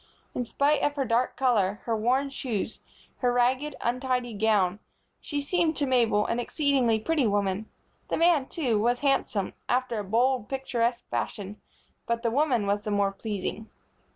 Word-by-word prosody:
In 245 - -2
spite 285 +5 +2
of 290 - +1
her 275 -2 0
dark 240 +2 +1
color, 210 -6 +2
her 230 - 0
worn 255 +6 +1
shoes, 225 -6 -3 0.4
her 250 -1 +1
ragged, 255 +4 +1
untidy 250 -1 -1
gown, 205 -3 +2 0.4
she 290 -2 -3
seemed 325 +2 +1
to 290 - +1
Mabel 235 -5 +2
an 235 - -1
exceedingly 255 -4 +1
pretty 290 +1 +1
woman. 205 0 -1 0.4
The - - 0
man, 330 -5 +4
too, 245 -10 0
was 240 +3 +1
handsome, 270 -8 0 0.2
after 250 -3 0
a - - -3
bold, 235 +3 +1
picturesque 245 -3 -1
fashion; 205 0 -4 0.5
but 235 0 -1
the 230 - +1
woman 255 -5 +2
was 200 +1 0
the 210 - -5
more 200 -1 +2
pleasing. 205 +1 -5
240 Hz, 160 wpm, -27 LUFS, 215-270 Hz, 0.5 s, man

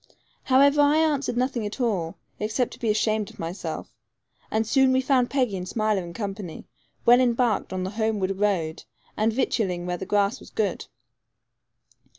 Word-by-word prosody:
However, 280 +2 +5
I 290 +1 +4
answered 295 -6 +1
nothing 250 -2 0
at 210 +5 -5
all, 195 -10 -1 0.2
except 220 +4 -1
to - - -12
be 230 - -1
ashamed 215 -1 +1
of - - -16
myself; 170 +4 -5 0.6
and 220 +1 0
soon 265 +3 +4
we 260 - +3
found 260 -2 +2
Peggy 255 -7 0
and 180 0 -6
Smiler 215 -4 0
in 170 - -8
company, 195 -2 -6 0.4
well 245 +1 +7
embarked 240 -2 +1
on 185 -1 -2
the 190 - -3
homeward 210 -3 -1
road, 180 -7 0 0.3
and 215 +1 +2
victualling 200 -7 -1
where 180 0 -2
the 190 - -7
grass 205 +3 +1
was - - -13
good. 215 -2 -2
215 Hz, 165 wpm, -25 LUFS, 195-255 Hz, 0.6 s, well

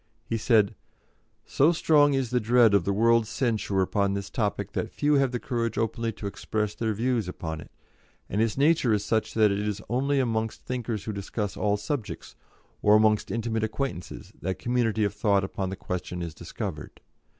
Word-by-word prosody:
He - - -2
said: 110 -3 +3 0.7
"So 150 +5 +3
strong 150 -4 +4
is 130 -3 -1
the 125 - +2
dread 115 -1 +4
of 100 -4 +3
the 100 - +1
world's 115 +2 +3
censure 110 -5 0
upon 100 +1 0
this 100 -1 -5
topic 100 -3 -2
that 110 - -2
few 150 +5 +1
have 135 -2 +2
the 125 - -2
courage 115 -3 -2
openly 115 +1 -1
to 105 - -9
express 105 +1 -2
their 110 -1 -2
views 120 -2 0
upon 80 -3 -5
it; - - -13 0.6
and 105 - -1
its 115 0 0
nature 145 -5 +3
is 105 - 0
such 110 -1 0
that 110 -2 +4
it 100 - -1
is 105 0 -2
only 135 +4 +1
amongst 115 -3 -1
thinkers 120 -5 -3
who 110 - -4
discuss 100 0 -4
all 105 -1 +1
subjects, 110 +2 -5 0.5
or 105 0 +6
amongst 110 -1 +3
intimate 115 -1 -1
acquaintances, 110 -5 -4
that 95 -1 -2
community 115 -2 0
of 100 -1 0
thought 105 -2 +2
upon 95 0 -3
the 95 - -4
question 90 -2 -4
is 85 -2 -5
discovered. - - -6
110 Hz, 185 wpm, -27 LUFS, 100-120 Hz, 0.7 s, or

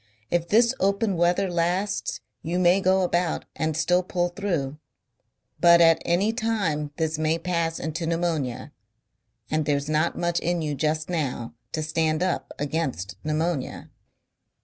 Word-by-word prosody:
If 170 -1 +1
this 230 +5 +4
open 200 +1 +1
weather 175 +3 +2
lasts 180 +3 -1 0.2
you 170 +3 -2
may 180 +2 +4
go 190 0 +3
about 175 -1 0
and 155 -1 -1
still 180 +3 +3
pull 175 -1 -1
through. 170 -7 -2 0.8
But 170 0 +7
at 165 -1 +5
any 195 +6 +1
time 200 - -1
this 160 -1 -1
may 155 +1 +1
pass 165 -1 -1
into 160 +1 -3
pneumonia. 165 -7 -1 0.8
And 155 -1 +1
there's 145 0 0
not 155 +2 +1
much 175 -1 0
in 175 -1 -1
you 150 -1 -1
just 155 +2 -1
now 140 -9 -3 0.2
to 155 - -1
stand 160 +1 0
up 185 -1 -2
against 140 - -2
pneumonia...." 155 -1 -2
170 Hz, 145 wpm, -25 LUFS, 155-180 Hz, 0.8 s, But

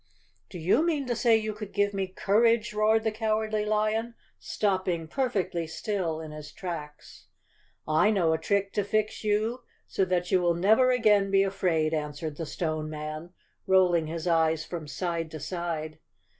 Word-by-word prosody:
"Do 185 - -8
you 180 - +2
mean 310 -5 0
to 245 -1 -1
say 230 -1 +4
you 215 -1 -3
could 210 -1 -8
give 205 0 +1
me 195 -1 -1
courage?" 215 +4 +2
roared 215 +1 +3
the 220 - +1
Cowardly 215 -1 -1
Lion, 215 +2 0 0.2
stopping 185 -5 -1
perfectly 195 - -1
still 170 -2 -2
in 160 -1 -7
his 150 -1 -9
tracks. 155 -5 -8 0.6
"I 155 +7 +3
know 175 -7 +2
a 160 - -1
trick 200 +2 0
to 205 - +1
fix 215 +2 -1
you 215 +4 0 0.2
so 195 - 0
that 180 -1 -1
you 185 -2 +4
will 175 -1 +2
never 220 +9 +4
again 210 -5 +3
be 195 0 +4
afraid," 180 -5 0
answered 150 0 -4
the 165 - -4
Stone 155 -2 -3
Man, 155 +3 -6 0.3
rolling 180 -4 +4
his 165 0 -5
eyes 160 -2 +2
from 165 -4 -6
side 170 0 -3
to 155 - -7
side. 160 -1 -4
190 Hz, 170 wpm, -27 LUFS, 160-215 Hz, 0.6 s, say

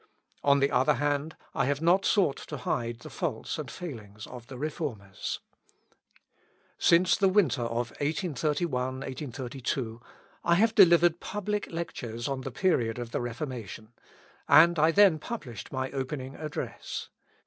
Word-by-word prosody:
On 140 0 +5
the 140 - +3
other 130 - +3
hand, 145 +3 -1 0.2
I - - +1
have 140 +1 0
not 175 +5 +3
sought 185 -10 +3
to 150 - -5
hide 120 -2 -2
the - - -9
faults - - -3
and - - -5
failings 110 - -8
of 125 -1 -10
the 130 - -8
Reformers. 130 - -4 1.4
Since 175 +2 +5
the 195 -3 +3
winter 170 - +3
of 115 0 -2
1831 145 -3 -1
32, 125 -3 -4 0.4
I 170 - +4
have 220 +4 +3
delivered 175 -4 +6
public 210 +1 -3
lectures 120 -9 -4
on 135 -1 -2
the 135 - -4
period 120 -7 +1
of 120 -1 -5
the - - -1
Reformation, 120 -3 -6 0.6
and 170 +1 +7
I 155 +2 +5
then 185 -2 +5
published 150 - -7
my 130 0 -2
opening 135 0 -4
Address. 155 +1 -5
140 Hz, 140 wpm, -29 LUFS, 120-170 Hz, 1.4 s, and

